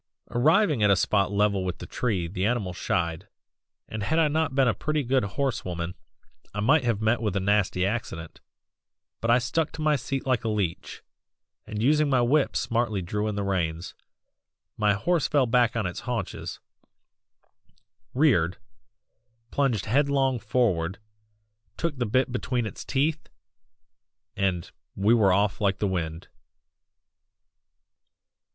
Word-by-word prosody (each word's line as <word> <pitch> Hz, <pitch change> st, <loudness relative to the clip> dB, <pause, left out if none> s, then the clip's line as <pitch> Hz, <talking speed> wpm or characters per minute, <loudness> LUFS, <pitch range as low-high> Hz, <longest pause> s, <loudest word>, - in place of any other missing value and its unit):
Arriving 155 Hz, -, +3 dB
at 105 Hz, -, +4 dB
a 100 Hz, -, +6 dB
spot 100 Hz, +1 st, +1 dB
level 100 Hz, -1 st, +1 dB
with 90 Hz, -2 st, -3 dB
the -, -, -8 dB
tree 95 Hz, -3 st, -1 dB
the 90 Hz, +2 st, -4 dB
animal 105 Hz, -4 st, 0 dB
shied, 85 Hz, +1 st, -2 dB, 0.6 s
and 110 Hz, -, -5 dB
had 160 Hz, +10 st, 0 dB
I 160 Hz, -2 st, +4 dB
not 155 Hz, -2 st, 0 dB
been 135 Hz, -2 st, +4 dB
a 115 Hz, -, +3 dB
pretty 155 Hz, +3 st, -1 dB
good 130 Hz, +1 st, +1 dB
horse 135 Hz, +6 st, -2 dB
woman 85 Hz, -1 st, -4 dB, 0.6 s
I -, -, -2 dB
might 140 Hz, +7 st, +4 dB
have 115 Hz, -3 st, 0 dB
met 110 Hz, +2 st, +2 dB
with 105 Hz, -4 st, -1 dB
a -, -, +2 dB
nasty 95 Hz, -2 st, +1 dB
accident, 95 Hz, -7 st, -4 dB, 0.8 s
but 115 Hz, -, -2 dB
I 120 Hz, -, +6 dB
stuck 140 Hz, +6 st, -1 dB
to 155 Hz, -, -6 dB
my 155 Hz, -1 st, +3 dB
seat 135 Hz, 0 st, -3 dB
like 130 Hz, -3 st, +1 dB
a -, -, -2 dB
leech, 100 Hz, -6 st, -3 dB, 0.6 s
and 105 Hz, +1 st, -3 dB
using 150 Hz, +3 st, +3 dB
my 130 Hz, -2 st, +3 dB
whip 135 Hz, +4 st, +2 dB
smartly 115 Hz, -5 st, 0 dB
drew 105 Hz, +4 st, -2 dB
in 105 Hz, -, -2 dB
the 100 Hz, -, -2 dB
reins. 85 Hz, -3 st, -2 dB, 0.8 s
My 105 Hz, -1 st, +2 dB
horse 155 Hz, -, +1 dB
fell 140 Hz, -3 st, +3 dB
back 120 Hz, -1 st, +2 dB
on 115 Hz, -3 st, 0 dB
its 90 Hz, -, -4 dB
haunches; 120 Hz, -6 st, -4 dB, 1.6 s
reared 100 Hz, -, +3 dB, 0.9 s
plunged 125 Hz, -8 st, 0 dB
headlong 135 Hz, 0 st, +2 dB
forward 100 Hz, -7 st, 0 dB, 0.8 s
took 170 Hz, -3 st, -1 dB
the 120 Hz, -, 0 dB
bit 130 Hz, +4 st, +1 dB
between 125 Hz, -1 st, -1 dB
its 110 Hz, -, -6 dB
teeth 150 Hz, +3 st, -1 dB, 1.1 s
and 95 Hz, -3 st, -1 dB, 0.2 s
we 100 Hz, +4 st, +3 dB
were 105 Hz, -5 st, +4 dB
off 100 Hz, +2 st, +1 dB
like 100 Hz, -1 st, +2 dB
the 105 Hz, -, -1 dB
wind. 85 Hz, -3 st, -3 dB
110 Hz, 150 wpm, -26 LUFS, 95-135 Hz, 1.6 s, a